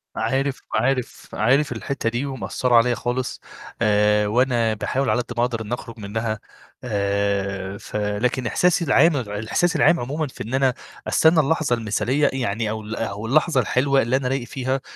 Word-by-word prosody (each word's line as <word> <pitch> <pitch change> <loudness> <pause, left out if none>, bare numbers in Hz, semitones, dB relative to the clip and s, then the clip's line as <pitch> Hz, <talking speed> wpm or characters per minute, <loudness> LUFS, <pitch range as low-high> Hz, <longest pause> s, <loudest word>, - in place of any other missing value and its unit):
عارف، 135 +4 -1
عارف، 130 -1 -1
عارف 135 +7 +2
الحتة 135 -5 -2
دي، 120 +4 -2
ومأثرة 130 -2 -1
عليَّا 120 +1 +4
خالص. 125 +1 -3 0.4
آآ 105 -1 +3
وأنا 120 -1 +2
باحاول 130 +4 -1
على 115 +3 +2
قد 120 - -7
ما - - +4
أقدر 115 -2 -3
إن 110 +2 -5
أخرج 115 -2 -7
منها. 110 +1 -3 0.4
آآ 100 -2 -1
ف 110 - -11
لكن 105 +5 -1
إحساسي 175 +5 +2
العام 150 +3 +4
الإحساس 110 - -1
العام 165 +2 +4
عمومًا، 145 +5 -2
في - - -8
إن 115 +4 -7
أنا 135 -1 +3 0.3
أستنى 160 0 +4
اللحظة 155 -3 +2
المثالية 120 +6 0
يعني، 115 -4 -1
أو 110 0 -3
ال 105 +1 -6
أو 110 -1 -4
اللحظة 140 +2 +3
الحلوة 135 +4 +2
اللي 120 +3 0
أنا 130 -1 0
رايق 130 -2 -2
فيها، 130 0 -2
120 Hz, 170 wpm, -22 LUFS, 110-135 Hz, 0.4 s, عليَّا